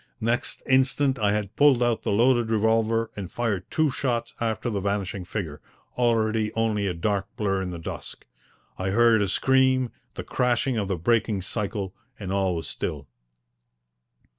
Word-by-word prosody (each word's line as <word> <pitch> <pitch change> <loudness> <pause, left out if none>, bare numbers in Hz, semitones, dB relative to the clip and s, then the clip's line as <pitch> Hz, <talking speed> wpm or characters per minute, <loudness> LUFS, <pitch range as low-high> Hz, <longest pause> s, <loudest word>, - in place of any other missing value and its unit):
Next 120 +2 -1
instant 130 0 +2
I 105 -1 +2
had 105 -1 -3
pulled 140 -4 +5
out 120 -2 +1
the - - -2
loaded 120 +2 +3
revolver 110 +1 +2
and 95 -4 -6
fired 105 -6 -2
two 155 -3 +2
shots 120 -2 -2
after 115 +1 -1
the 100 - -1
vanishing 100 -1 -2
figure, 80 -7 -5 0.3
already 110 -3 +1
only 110 -3 0
a 90 - -2
dark 100 +3 -1
blur 95 -2 0
in 95 - -3
the 90 - -5
dusk. 80 - -7 0.5
I 95 +1 -1
heard 115 +1 +4
a 100 - 0
scream, 130 +1 +3 0.2
the - - -5
crashing 125 +1 0
of 105 -3 -1
the 95 -2 -1
breaking 110 +1 +1
cycle, 100 -1 -3 0.3
and 95 -3 -5
all 95 -2 +1
was 80 -3 -4
still. 70 -1 -4
110 Hz, 165 wpm, -25 LUFS, 100-120 Hz, 0.5 s, pulled